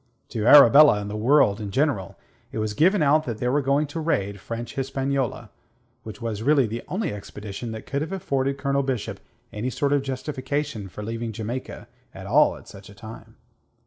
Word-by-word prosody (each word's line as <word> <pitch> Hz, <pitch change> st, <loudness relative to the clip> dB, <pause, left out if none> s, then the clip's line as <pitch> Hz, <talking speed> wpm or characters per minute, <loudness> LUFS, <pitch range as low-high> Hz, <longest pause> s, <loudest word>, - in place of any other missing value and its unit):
To 110 Hz, -2 st, -2 dB
Arabella 145 Hz, -3 st, +8 dB
and 105 Hz, 0 st, -5 dB
the -, -, -5 dB
world 110 Hz, -2 st, +3 dB
in 105 Hz, -, -5 dB
general 130 Hz, -3 st, -1 dB, 0.3 s
it -, -, -6 dB
was 110 Hz, -1 st, -2 dB
given 180 Hz, -, +3 dB
out 155 Hz, +2 st, +3 dB
that 115 Hz, -3 st, -4 dB
they 125 Hz, -, -2 dB
were 145 Hz, +3 st, +2 dB
going 140 Hz, +2 st, +1 dB
to 145 Hz, +3 st, -6 dB
raid 100 Hz, -11 st, -1 dB
French 115 Hz, +3 st, -6 dB
Hispaniola, 135 Hz, -3 st, -2 dB, 0.5 s
which 110 Hz, 0 st, -10 dB
was 115 Hz, -3 st, -4 dB
really 140 Hz, +1 st, +3 dB
the 115 Hz, +2 st, -5 dB
only 185 Hz, -, -2 dB
expedition 105 Hz, +2 st, -7 dB
that 110 Hz, -, -8 dB
could 140 Hz, +1 st, -3 dB
have 160 Hz, -, -4 dB
afforded 140 Hz, -7 st, -1 dB
Colonel 140 Hz, 0 st, 0 dB
Bishop 130 Hz, -5 st, -3 dB, 0.3 s
any 110 Hz, +4 st, -3 dB
sort 140 Hz, +3 st, 0 dB
of 145 Hz, -, +2 dB
justification 135 Hz, -4 st, -4 dB
for 105 Hz, -, -8 dB
leaving 115 Hz, +1 st, -4 dB
Jamaica 115 Hz, +4 st, -6 dB, 0.3 s
at -, -, -9 dB
all -, -, +4 dB
at -, -, -16 dB
such 100 Hz, 0 st, -13 dB
a 100 Hz, -, -14 dB
time. 110 Hz, +3 st, -12 dB
125 Hz, 190 wpm, -24 LUFS, 110-140 Hz, 0.5 s, Arabella